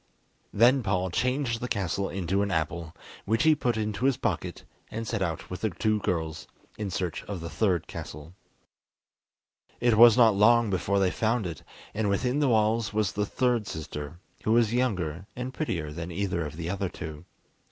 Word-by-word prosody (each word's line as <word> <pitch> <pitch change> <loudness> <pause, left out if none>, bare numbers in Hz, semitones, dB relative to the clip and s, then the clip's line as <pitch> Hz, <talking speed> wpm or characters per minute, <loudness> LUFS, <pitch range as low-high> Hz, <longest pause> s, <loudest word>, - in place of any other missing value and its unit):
Then 125 +5 +5
Paul 95 -4 0
changed 125 +2 0
the 125 - -2
castle 100 -3 -1
into 95 +1 -1
an 100 - 0
apple, 85 -1 -2 0.3
which 110 +3 +1
he 160 0 +6
put 120 -6 0
into 110 +2 -2
his 135 -2 +3
pocket, - - -3 0.3
and 115 0 -5
set 115 -4 -2
out 85 -3 -3
with 90 - -5
the 110 - +1
two 110 +3 0
girls 80 -5 -2 0.3
in 105 -2 -4
search 90 -2 -3
of 100 -3 -5
the 85 0 -6
third 95 -7 +1
castle. 75 +3 -8 1.5
It 120 -2 +3
was 120 -1 +9
not 115 -3 +6
long 115 +1 +5
before 100 +1 0
they 95 -2 +3
found 110 -1 0
it, 85 -4 -5 0.3
and 105 -1 0
within 125 +7 +1
the 145 -3 +3
walls 110 -1 +2
was 105 -2 0
the 105 0 -1
third 120 -3 0
sister, 75 -1 -6 0.3
who 110 - +2
was 115 -1 +3
younger 95 -8 -1
and 125 +1 -5
prettier 85 - -3
than 85 +3 -6
either 85 -3 -1
of 75 - -9
the 85 -1 -4
other 95 +1 -2
two. 80 -1 -8
100 Hz, 185 wpm, -27 LUFS, 85-115 Hz, 1.5 s, was